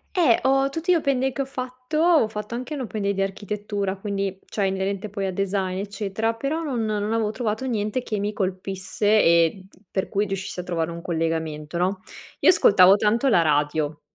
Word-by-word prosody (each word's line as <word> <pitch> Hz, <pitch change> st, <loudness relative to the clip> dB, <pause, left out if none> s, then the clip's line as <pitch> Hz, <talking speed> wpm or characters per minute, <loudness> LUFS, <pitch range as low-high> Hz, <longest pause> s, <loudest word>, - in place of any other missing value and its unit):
Eh, 315 Hz, -11 st, +5 dB
ho 270 Hz, +1 st, +3 dB
tutti 325 Hz, +5 st, -1 dB
gli 355 Hz, -, +6 dB
open 275 Hz, -5 st, +1 dB
day 265 Hz, +1 st, +1 dB
che 275 Hz, -, -3 dB
ho 275 Hz, -, -1 dB
fatto 255 Hz, +2 st, -5 dB
ho 320 Hz, -7 st, +4 dB
fatto 210 Hz, +1 st, -6 dB
anche 250 Hz, +5 st, -4 dB
l'open 220 Hz, -6 st, -4 dB
day 200 Hz, 0 st, +1 dB
di 195 Hz, -, +1 dB
architettura, 200 Hz, 0 st, -3 dB
quindi 195 Hz, -1 st, -3 dB
cioè 200 Hz, -2 st, -2 dB
inerente 195 Hz, +2 st, -2 dB
poi 200 Hz, -1 st, -3 dB
a 190 Hz, -, -2 dB
design, 190 Hz, -1 st, -1 dB
eccetera, 205 Hz, +2 st, -2 dB
però 285 Hz, +7 st, -2 dB
non 250 Hz, -8 st, -2 dB
non 210 Hz, 0 st, -1 dB
avevo 220 Hz, -2 st, 0 dB
trovato 220 Hz, +1 st, -2 dB
niente 220 Hz, 0 st, -1 dB
che 215 Hz, -2 st, -3 dB
mi 205 Hz, +1 st, -1 dB
colpisse 190 Hz, +1 st, -3 dB, 0.2 s
e 170 Hz, +3 st, +3 dB
d -, -, -24 dB
per 190 Hz, -, -2 dB
cui 205 Hz, +1 st, 0 dB
riuscissi 190 Hz, -1 st, -4 dB
a -, -, -3 dB
trovare 170 Hz, -2 st, -2 dB
un 170 Hz, 0 st, -7 dB
collegamento, 160 Hz, -1 st, -2 dB
no? 185 Hz, +1 st, 0 dB, 0.4 s
Io -, -, +6 dB
ascoltavo 195 Hz, -, +6 dB
tanto 220 Hz, +6 st, +1 dB
la 210 Hz, -9 st, +5 dB
radio 150 Hz, 0 st, 0 dB
205 Hz, 200 wpm, -24 LUFS, 185-235 Hz, 0.4 s, gli